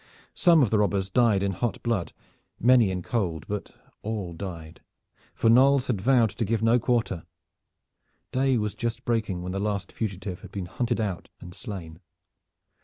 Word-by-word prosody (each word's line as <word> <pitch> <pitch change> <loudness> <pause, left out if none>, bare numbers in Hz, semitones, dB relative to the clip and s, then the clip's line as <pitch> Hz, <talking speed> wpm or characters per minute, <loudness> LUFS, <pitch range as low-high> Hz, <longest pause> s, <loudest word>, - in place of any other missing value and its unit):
Some 170 -5 +5
of 115 - 0
the 110 - +3
robbers 100 -1 0
died 110 -3 +3
in 100 - +1
hot 110 +5 -3
blood, 115 -7 -1 0.5
many 120 -3 +5
in 90 -1 -3
cold; 85 -10 -2
but 105 -1 -4 0.3
all 105 -5 -4
died, 80 -3 -8 0.5
for - - +1
Knolles 130 +3 +5
had 110 -8 -1
vowed 120 -2 +4
to 115 - -3
give 110 +1 0
no 115 +2 +4
quarter. 115 -8 0 1.1
Day 130 0 +2
was 105 -2 -1
just 120 0 -4
breaking 110 -6 -1
when 90 - -4
the 95 - -2
last 100 -1 -2
fugitive 95 -4 -4
had - - -11
been 95 -3 -4
hunted 120 +6 -2
out 100 -5 -3
and 90 - -10
slain. 90 -8 -7
105 Hz, 170 wpm, -26 LUFS, 95-120 Hz, 1.1 s, Some